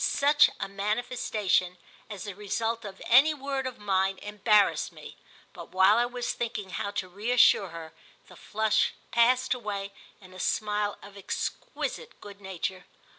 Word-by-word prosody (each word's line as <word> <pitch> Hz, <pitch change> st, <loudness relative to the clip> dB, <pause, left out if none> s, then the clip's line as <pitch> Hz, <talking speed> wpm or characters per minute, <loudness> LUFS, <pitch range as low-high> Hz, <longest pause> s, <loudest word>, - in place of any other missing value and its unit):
Such 290 Hz, +1 st, +4 dB
a -, -, -2 dB
manifestation, 200 Hz, -3 st, -1 dB, 0.3 s
as 205 Hz, -3 st, -7 dB
the 205 Hz, -, -6 dB
result 225 Hz, +3 st, -2 dB
of 195 Hz, -1 st, -9 dB
any 280 Hz, +6 st, +6 dB
word 275 Hz, -1 st, -3 dB
of 255 Hz, -, -7 dB
mine, 195 Hz, -1 st, 0 dB
embarrassed 205 Hz, +1 st, +2 dB
me; -, -, -12 dB, 0.4 s
but -, -, -10 dB
while 190 Hz, +4 st, +5 dB
I 240 Hz, -, +2 dB
was 245 Hz, 0 st, -3 dB
thinking 225 Hz, -5 st, -4 dB
how 200 Hz, -, -3 dB
to 195 Hz, -2 st, -4 dB
reassure 205 Hz, 0 st, +3 dB
her 165 Hz, -1 st, -9 dB, 0.3 s
the -, -, -15 dB
flush 220 Hz, 0 st, 0 dB, 0.2 s
passed 250 Hz, +3 st, +3 dB
away 200 Hz, -5 st, -5 dB, 0.3 s
in 185 Hz, -2 st, -16 dB
a 185 Hz, -, -11 dB
smile 210 Hz, +1 st, -1 dB
of 200 Hz, 0 st, -12 dB
exquisite 485 Hz, -, -5 dB
good 205 Hz, -1 st, -12 dB
nature. 190 Hz, -1 st, -5 dB
210 Hz, 150 wpm, -28 LUFS, 195-240 Hz, 0.4 s, any